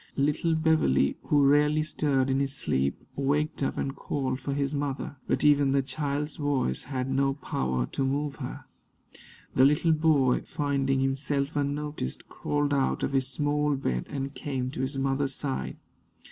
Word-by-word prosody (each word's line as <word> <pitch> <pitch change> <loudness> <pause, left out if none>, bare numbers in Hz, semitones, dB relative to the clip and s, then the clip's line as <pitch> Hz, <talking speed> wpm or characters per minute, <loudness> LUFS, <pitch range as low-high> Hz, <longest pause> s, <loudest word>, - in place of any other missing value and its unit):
Little 150 +4 +1
Beverley, 155 - +3
who 145 -2 +4
rarely 150 +2 +4
stirred 140 -3 +1
in 135 - +2
his 140 0 -1
sleep, 70 - 0 0.2
waked 145 +3 0
up 135 - -1
and 135 0 -2
called 135 -2 -2
for 140 -1 -3
his 140 0 -1
mother; 140 -1 -3
but - - 0
even 145 -2 +4
the 140 -1 +2
child's 145 +2 -3
voice 140 - 0
had 130 -2 -3
no 135 0 +1
power 65 - -1
to 135 - -1
move 140 0 -1
her. - - -7 0.9
The 130 - +4
little 150 +4 +4
boy, 155 -5 +3
finding 140 -3 0
himself 140 +2 -1
unnoticed, 145 - -3
crawled 145 0 -1
out 135 -1 +1
of - - -1
his 135 -1 +2
small 145 +2 0
bed 65 - -2
and 140 -1 -4
came 130 -4 -3
to 150 - -4
his 135 +1 -2
mother's 135 0 0
side. 135 -3 -3
140 Hz, 160 wpm, -28 LUFS, 135-145 Hz, 0.9 s, who